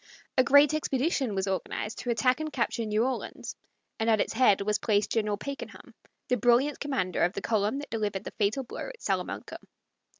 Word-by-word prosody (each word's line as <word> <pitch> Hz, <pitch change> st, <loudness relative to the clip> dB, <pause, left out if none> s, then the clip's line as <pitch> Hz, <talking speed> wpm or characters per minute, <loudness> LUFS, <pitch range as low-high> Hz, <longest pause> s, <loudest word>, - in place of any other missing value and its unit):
A 260 Hz, -, +5 dB
great 285 Hz, +3 st, +6 dB
expedition 275 Hz, -5 st, 0 dB
was 190 Hz, 0 st, 0 dB
organized 195 Hz, +2 st, -3 dB
to 245 Hz, -, -5 dB
attack 245 Hz, +3 st, +2 dB
and 310 Hz, 0 st, -3 dB
capture 235 Hz, -3 st, -1 dB
New 215 Hz, +2 st, +2 dB
Orleans, 260 Hz, -1 st, -4 dB, 0.4 s
and 225 Hz, +1 st, +1 dB
at 220 Hz, -1 st, +4 dB
its -, -, 0 dB
head 225 Hz, -4 st, +4 dB
was 210 Hz, +1 st, 0 dB
placed 210 Hz, -2 st, +1 dB
General 210 Hz, -2 st, 0 dB
Pakenham, 280 Hz, +6 st, -8 dB, 0.3 s
the 250 Hz, -, +2 dB
brilliant 245 Hz, +5 st, +3 dB
commander 265 Hz, -11 st, -1 dB
of 175 Hz, +2 st, +3 dB
the -, -, -4 dB
column 215 Hz, +2 st, +1 dB
that 290 Hz, -, -7 dB
delivered 210 Hz, -3 st, -2 dB
the -, -, -6 dB
fatal 215 Hz, +6 st, 0 dB
blow 255 Hz, -, -6 dB
at -, -, -12 dB
Salamanca. -, -, -3 dB
230 Hz, 190 wpm, -28 LUFS, 210-270 Hz, 0.4 s, great